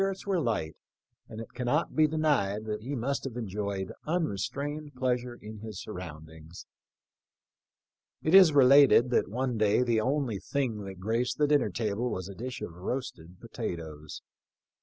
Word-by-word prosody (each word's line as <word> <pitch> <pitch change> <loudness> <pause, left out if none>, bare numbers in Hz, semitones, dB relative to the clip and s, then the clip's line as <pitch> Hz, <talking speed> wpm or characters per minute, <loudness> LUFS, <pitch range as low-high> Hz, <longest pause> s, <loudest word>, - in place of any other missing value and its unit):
24 195 0 +1 0.2
THE 180 - +2
LIFE 100 - -1 0.5
OF 110 - -8
LWCOLJV. 120 +2 -6
not 150 +7 0
be 155 0 +5
denied 145 -10 0
that 105 -1 -3
he 135 +6 -4
nnust 140 +4 -2
have 125 -3 -5
enjoyed 100 -3 -3
unre 160 - 0
strained 145 +6 -4
pleasure 125 -1 -1
in 110 0 -9
his 110 -3 -7
surroundings. 80 -1 -9 1.6
It 160 - +1
is 190 -4 +9
related 135 -2 +6
that - - +2
one 125 +1 -2
day 110 +3 +3
the 115 -3 +2
only 130 -4 -1
thing 115 -7 -2
that 95 -1 -8
graced 115 +5 -1
the 150 - +3
dinner 145 -6 +3
table 110 +3 -2
was 90 -4 -4
a 100 - -8
dish 125 +5 -6
of 85 - -6
roasted 90 -3 -6
potatoes. 80 -3 -6
115 Hz, 160 wpm, -29 LUFS, 100-140 Hz, 1.6 s, is